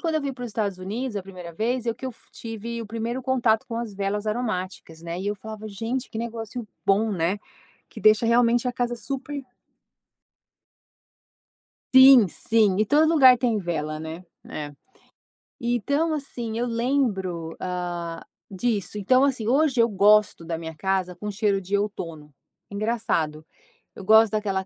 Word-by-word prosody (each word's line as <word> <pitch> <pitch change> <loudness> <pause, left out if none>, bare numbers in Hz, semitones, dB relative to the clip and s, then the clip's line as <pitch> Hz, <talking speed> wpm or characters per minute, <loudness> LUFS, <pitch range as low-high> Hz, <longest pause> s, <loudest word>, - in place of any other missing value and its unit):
quando 325 -2 0
eu 310 - 0
vim 280 -1 -3
para 250 -1 -10
os 240 - -5
Estados 200 -3 -2
Unidos, 215 +5 -4
a 200 - -3
1ª 180 -3 -10
vez 235 +6 -1
é - - +2
o - - -4
que 260 - -7
f 245 - -8
tive 230 +1 -6
o - - -8
1º 230 +4 -4
contato 240 -4 +1
com 230 - -5
as 230 -3 -4
velas 200 +2 -2
aromáticas, 190 -7 -3
né. 170 +1 -5
E 195 - -5
eu 205 - 0
falava: 215 +1 -8
"Gente, 230 +6 -4
que 220 - -5
negócio 230 0 -5 0.2
bom, 210 +2 +3
né", 180 +3 0 0.5
que - - -11
deixa 215 +1 +5
realmente 235 +1 +3
a - - -2
casa 240 -1 -2
super 275 +2 -5 2.5
Sim, 260 -5 +9
sim, 215 +2 +2
em - - +2
todo 300 +7 +4
lugar 265 -6 +7
tem 235 -3 +1
vela, 155 -5 -3
né. 160 +3 -7 0.3
É. 145 -1 -5 0.9
Então, 280 +7 0
assim 240 -6 -4
eu 240 - 0
lembro, 225 -9 -1
hã, 175 -2 -4 0.3
disso. 210 0 -2
Então, 255 +7 +4
assim, 250 -6 0
hoje 270 -1 +3
eu 230 - +5
gosto 205 -3 +3
da 165 0 -3
minha 160 -1 -7
casa 190 0 -1
com 210 +4 -5
cheiro 200 -1 0
de 195 +2 -1
outono. 165 -7 -5 0.4
Engraçado, 200 -8 -1 0.5
eu - - -10
gosto 220 +2 +6
daquela 200 -3 -1
215 Hz, 165 wpm, -24 LUFS, 190-240 Hz, 2.5 s, Sim